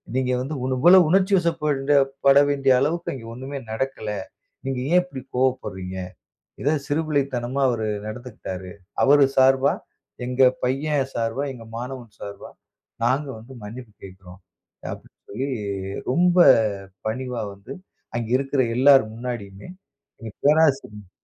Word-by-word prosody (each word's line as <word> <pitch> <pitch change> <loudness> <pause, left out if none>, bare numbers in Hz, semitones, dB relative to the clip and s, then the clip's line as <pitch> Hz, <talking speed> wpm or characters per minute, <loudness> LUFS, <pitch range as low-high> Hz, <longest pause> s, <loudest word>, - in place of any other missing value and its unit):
நீங்க 130 -1 +1
வந்து 145 +4 -4
இவ்ண 130 0 -1
இவ்வளவு 175 +2 +7
உணர்ச்சிவசப்பட 165 -7 +2 0.3
பட 140 0 +7
வேண்டிய 135 -2 +3
அளவுக்கு 170 +3 -1
அங்க 115 -3 -9
ஒண்ணுமே 135 +3 -6
நடக்கல. 110 -2 -3 0.6
நீங்க 135 -2 -2
ஏன் 180 0 +5
இப்படி 135 -8 -9
கோவப்பட்றீங்க? 100 -8 -1 0.6
இது 145 +3 +2
சிறுபிள்ளைத்தனமா 140 -4 -1
அவரு 110 -3 -1 0.2
நடந்துக்கிட்டாரு. 110 -6 -7 0.3
அவரு 145 0 +6
சார்பா, 130 +1 +5 0.5
எங்க 125 +1 0 0.2
பையன் 140 +2 0
சார்பா, 115 +4 -1
எங்கள் 115 -2 -12
மாணவன் 125 -3 -7
சார்பா, 100 - -8 0.6
நாங்க 135 +4 +1
வந்து 125 +4 -13
மன்னிப்பு 115 +1 -9
கேட்குறோம்." 95 -1 -12 0.5
அப்டின்னு - - -11
சொல்லி 130 +7 -3 0.6
ரொம்ப 175 +5 +3 0.7
பணிவா 125 0 -3
வந்து, 100 +1 -13 0.4
அங்கு 115 0 -3
இருக்குற 135 0 0 0.2
எல்லார் 135 -1 +7
முன்னாடியுமே 115 - -7 0.5
எங்க 110 -2 -7
பேராசிரியும் 135 - +2
130 Hz, 120 wpm, -23 LUFS, 115-145 Hz, 0.7 s, இவ்வளவு